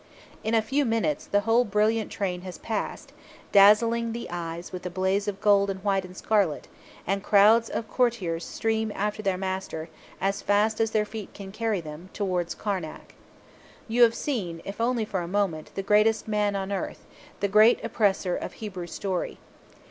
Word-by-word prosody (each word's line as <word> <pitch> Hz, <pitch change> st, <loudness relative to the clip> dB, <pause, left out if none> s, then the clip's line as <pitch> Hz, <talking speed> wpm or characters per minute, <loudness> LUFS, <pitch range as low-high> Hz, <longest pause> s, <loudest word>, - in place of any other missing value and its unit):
In 220 Hz, +1 st, +1 dB
a 220 Hz, -, +3 dB
few 275 Hz, +6 st, +1 dB
minutes 225 Hz, -, 0 dB
the 205 Hz, -, +2 dB
whole 225 Hz, +3 st, +3 dB
brilliant 215 Hz, +1 st, +1 dB
train 180 Hz, -3 st, -2 dB
has 185 Hz, -1 st, -8 dB
passed, 220 Hz, -2 st, -4 dB, 0.4 s
dazzling 230 Hz, +3 st, +5 dB
the 235 Hz, -, -5 dB
eyes 170 Hz, 0 st, -5 dB
with 180 Hz, -, -6 dB
a -, -, -3 dB
blaze 190 Hz, +3 st, 0 dB
of 200 Hz, -1 st, -3 dB
gold 200 Hz, -1 st, +4 dB
and 190 Hz, -1 st, -3 dB
white 195 Hz, -2 st, +1 dB
and 185 Hz, 0 st, -11 dB
scarlet; 200 Hz, -9 st, +1 dB, 0.4 s
and 195 Hz, +2 st, 0 dB
crowds 215 Hz, +3 st, +5 dB
of 225 Hz, -, -3 dB
courtiers 205 Hz, -10 st, 0 dB
stream 220 Hz, +2 st, -1 dB
after 210 Hz, +1 st, -2 dB
their 195 Hz, -3 st, 0 dB
master, 190 Hz, -4 st, -4 dB, 0.3 s
as 195 Hz, +1 st, -1 dB
fast 215 Hz, +2 st, +2 dB
as 225 Hz, -, +2 dB
their 215 Hz, -1 st, +1 dB
feet 210 Hz, -1 st, -8 dB
can 195 Hz, -1 st, -8 dB
carry 215 Hz, -2 st, -1 dB
them, 155 Hz, +3 st, -9 dB
towards 180 Hz, -4 st, -1 dB
Karnak. 185 Hz, -7 st, -5 dB, 0.7 s
You 235 Hz, +2 st, +1 dB
have 230 Hz, -1 st, +6 dB
seen, 185 Hz, -, -3 dB
if 200 Hz, +3 st, -5 dB
only 235 Hz, -1 st, +1 dB
for 190 Hz, -3 st, -2 dB
a 170 Hz, -, -5 dB
moment, 180 Hz, -5 st, -1 dB
the 195 Hz, -, -3 dB
greatest 215 Hz, +3 st, +3 dB
man 210 Hz, -1 st, +1 dB
on 195 Hz, 0 st, -3 dB
earth 195 Hz, -, -4 dB, 0.3 s
the 200 Hz, -, +1 dB
Great 215 Hz, +4 st, +6 dB
Oppressor 200 Hz, -5 st, +1 dB
of -, -, -5 dB
Hebrew 190 Hz, -5 st, -6 dB
story. 190 Hz, 0 st, -3 dB
205 Hz, 180 wpm, -26 LUFS, 185-220 Hz, 0.7 s, have